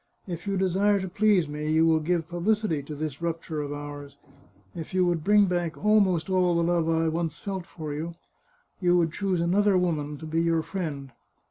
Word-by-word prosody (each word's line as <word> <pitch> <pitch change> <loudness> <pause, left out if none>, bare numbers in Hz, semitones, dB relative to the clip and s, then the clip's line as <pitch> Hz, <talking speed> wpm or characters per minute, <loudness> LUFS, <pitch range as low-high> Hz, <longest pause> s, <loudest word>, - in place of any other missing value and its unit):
If 175 0 -6
you 195 -1 0
desire 195 +2 +2
to 190 - -4
please 195 -2 +2
me, 150 +1 -3
you 160 +1 +4
will 160 -1 +4
give 165 +1 -1
publicity 175 -1 0
to 150 +2 -8
this 150 0 -5
rupture 165 -2 -3
of 145 -1 -5
ours. 145 -1 -7 0.6
If 165 +3 -7
you 185 -1 +3
would 170 -3 0
bring 205 +2 +5
back 175 -3 -2
almost 200 -5 +3
all 180 -2 +2
the 170 - +2
love 170 -1 +1
I 165 0 +2
once 160 -1 -2
felt 190 +2 -5
for 155 -3 -6
you, 160 +3 -4 0.7
you 180 -1 +3
would 165 -2 +2
choose 190 -4 -1
another 195 +3 +3
woman 150 -5 -1
to 160 - -9
be 160 +1 0
your 165 -1 +1
friend. 150 -8 -5
170 Hz, 200 wpm, -26 LUFS, 155-185 Hz, 0.7 s, bring